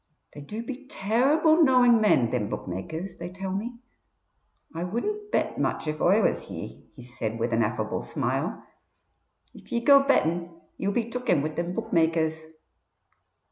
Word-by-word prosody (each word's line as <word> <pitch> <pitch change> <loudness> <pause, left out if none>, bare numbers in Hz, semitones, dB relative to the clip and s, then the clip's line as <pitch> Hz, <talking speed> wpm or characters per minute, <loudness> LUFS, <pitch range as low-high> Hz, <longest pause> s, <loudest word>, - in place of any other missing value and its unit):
They 145 - -9
do 210 +11 -6
be 265 +3 -8
terrible 290 - +3
knowing 250 -5 +5
men, 130 - +3
thim 110 -5 -1
bookmakers, 160 - -5
they 170 +1 -6
tell 190 +1 -5
me. 230 +5 -4 1.0
I 165 +1 -4
wouldn't 415 - -3
bet - - 0
much - - -1
if 155 0 -3
Oi 200 +4 +4
was - - 0
ye," - - -8
he - - -11
said, 120 -2 -5
with 115 +1 -1
an 115 - +2
affable 110 0 -1
smile. - - -3 0.9
"If - - -16
ye 235 - +1
go 280 -1 +8
bettin' 170 - 0 0.2
ye 190 - -2
will 200 - 0
be 235 -1 -1
took 250 +1 -4
in 150 -5 +3
wid 155 0 -3
thim 175 +1 -3
bookmakers." 160 -1 0
180 Hz, 165 wpm, -26 LUFS, 155-240 Hz, 1.0 s, go